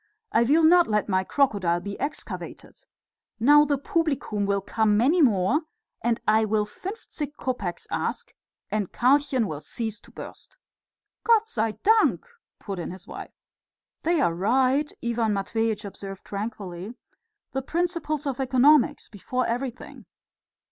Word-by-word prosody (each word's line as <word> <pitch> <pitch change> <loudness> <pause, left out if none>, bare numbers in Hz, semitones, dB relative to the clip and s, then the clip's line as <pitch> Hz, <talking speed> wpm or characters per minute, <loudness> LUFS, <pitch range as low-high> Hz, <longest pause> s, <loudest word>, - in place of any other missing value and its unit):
"I 230 - +3
will 295 +8 +4
not 345 +2 +6
let 210 -1 0
my 190 -2 +1
crocodile 195 -9 +1
be 200 +2 -7
excavated. 305 - -6 0.5
Now 295 +5 +6
the 285 -1 +1
publicum 275 -9 -1
will 200 0 +1
come 210 +1 +1
many 290 +10 +3
more, 235 - +3 0.4
and 235 -1 +1
I 215 +1 +4
will 215 0 +1
fünfzig 360 - -7
kopecks 225 -12 -4
ask - - -3 0.4
and 210 -4 -1
Karlchen 260 -1 +2
will 155 -7 -4
cease 225 +2 -4
to - - -19
burst." - - -11 0.7
"Gott 450 -1 +4
sei 220 - -1
dank!" 445 +2 +3 0.3
put 195 -3 -6
in 170 - -4
his 185 0 -9
wife. - - -9 0.7
"They 340 0 +1
are 170 -12 +2
right," 255 - +2
Ivan 230 -2 +1
Matveitch 220 +1 -1
observed 195 -1 -8
tranquilly; 200 -1 -6 0.6
"the 270 - -2
principles 330 -1 -2
of 275 -2 -2
economics 265 +2 +4
before 250 +4 -3
everything." 245 +1 -5
235 Hz, 135 wpm, -25 LUFS, 205-290 Hz, 0.7 s, not